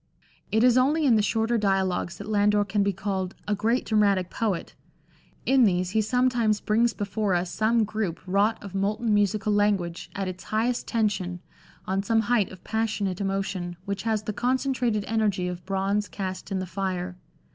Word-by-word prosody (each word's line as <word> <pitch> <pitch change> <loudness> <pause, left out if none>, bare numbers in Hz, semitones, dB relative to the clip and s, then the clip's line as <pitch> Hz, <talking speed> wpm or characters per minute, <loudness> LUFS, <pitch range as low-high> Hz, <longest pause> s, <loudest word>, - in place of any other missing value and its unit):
It 220 +2 +3
is 250 0 +6
only 295 +5 +2
in 245 -5 +5
the 215 - +4
shorter 225 +2 +1
dialogues 190 -3 0
that 200 - -7
Landor 205 -1 +3
can 205 0 0
be 200 0 +2
called 190 -1 -3
" - - -30
a 210 - +1
great 225 +5 +1
dramatic 200 -4 +2
poet." 205 -7 -2 0.7
In 265 -1 +5
these 180 -3 +2
he 220 +1 +2
sometimes 235 -2 +2
brings 230 +2 +2
before 205 -2 -1
us 175 0 -1
some 225 +1 +2
group 210 -5 -2
wrought 200 +4 +2
of 200 -2 -8
molten 210 +3 0
musical 205 +1 +2
language 200 -5 0
at 195 -1 -2
its 185 -1 -7
highest 235 +3 -1
tension, 200 -6 -1 0.5
on 190 +1 0
some 225 +2 +2
height 230 -4 +1
of 185 -1 -12
passionate 210 -4 -1
emotion, 195 -3 -2
which 200 -1 -3
has 220 -2 -1
the 215 - -3
concentrated 250 -3 0
energy 210 -5 0
of 180 0 -5
bronze 195 +2 0
cast 190 0 -5
in 195 - 0
the 185 - -2
fire. 185 0 -3
205 Hz, 180 wpm, -26 LUFS, 190-220 Hz, 0.7 s, is